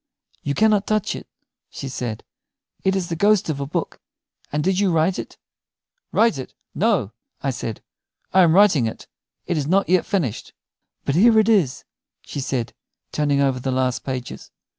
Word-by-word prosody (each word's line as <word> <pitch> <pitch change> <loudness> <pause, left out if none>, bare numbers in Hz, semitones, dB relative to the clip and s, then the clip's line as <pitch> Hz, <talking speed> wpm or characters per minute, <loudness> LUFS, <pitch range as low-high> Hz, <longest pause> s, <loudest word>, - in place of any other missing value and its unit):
"You 140 0 -2
cannot 210 -2 +3
touch 215 -2 0
it," - - -9 0.4
she 135 - -7
said. 125 -4 -4 0.6
"It 190 0 +2
is 185 -3 -2
the 165 - -2
ghost 205 +1 +3
of 140 - -5
a 140 - -3
book. - - -4 0.5
And 150 +1 -1
did 190 +2 +1
you 200 -3 +2
write 165 +3 +2
it?" - - -8 0.7
"Write 225 -11 +3
it? 130 - -8 0.2
No," 195 - +1 0.3
I 135 - +1
said; 115 -2 -5 0.5
"I 190 - +6
am 170 -2 +5
writing 185 - +5
it. 110 - -7 0.4
It 175 - -1
is 140 - -2
not 195 +4 +2
yet 185 -1 +3
finished." 155 - -2 0.5
"But 140 - 0
here 220 +7 +5
it 215 -1 +5
is," 190 - +2 0.4
she - - -6
said, 130 -3 -2 0.4
turning 145 -2 +1
over 135 -2 +1
the 130 - -3
last 130 -1 0
pages. 130 -2 -5
160 Hz, 175 wpm, -22 LUFS, 130-195 Hz, 0.7 s, I